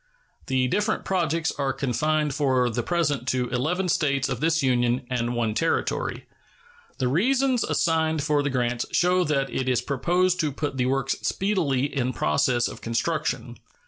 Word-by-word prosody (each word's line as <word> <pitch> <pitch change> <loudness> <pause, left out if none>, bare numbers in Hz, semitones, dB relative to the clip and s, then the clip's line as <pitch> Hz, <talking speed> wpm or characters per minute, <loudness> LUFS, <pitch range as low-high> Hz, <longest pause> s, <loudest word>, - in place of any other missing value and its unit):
The 130 -2 +1
different 210 - 0
projects 165 -3 0
are 135 -1 0
confined 150 +3 0
for 130 -4 +1
the 120 +2 -1
present 145 -3 -1
to 125 -2 0
eleven 155 +10 -1
States 140 -5 +1
of 125 -3 -3
this 160 +1 +1
Union 125 0 +1
and 120 -1 -1
one 115 -2 0
Territory. 165 +9 -1 0.7
The 130 - 0
reasons 250 - +2
assigned 160 -2 +1
for 150 -1 +2
the 145 - -1
grants 120 -2 -1
show 180 +1 +3
that 140 -3 0
it 130 0 -1
is 125 -2 +1
proposed 180 +6 +1
to 155 -2 +1
put 145 0 -4
the 125 -1 +1
works 135 +1 0
speedily 175 -10 0
in 130 -1 0
process 120 +8 +1
of - - -9
construction. 155 +8 -2
140 Hz, 160 wpm, -25 LUFS, 125-165 Hz, 0.7 s, show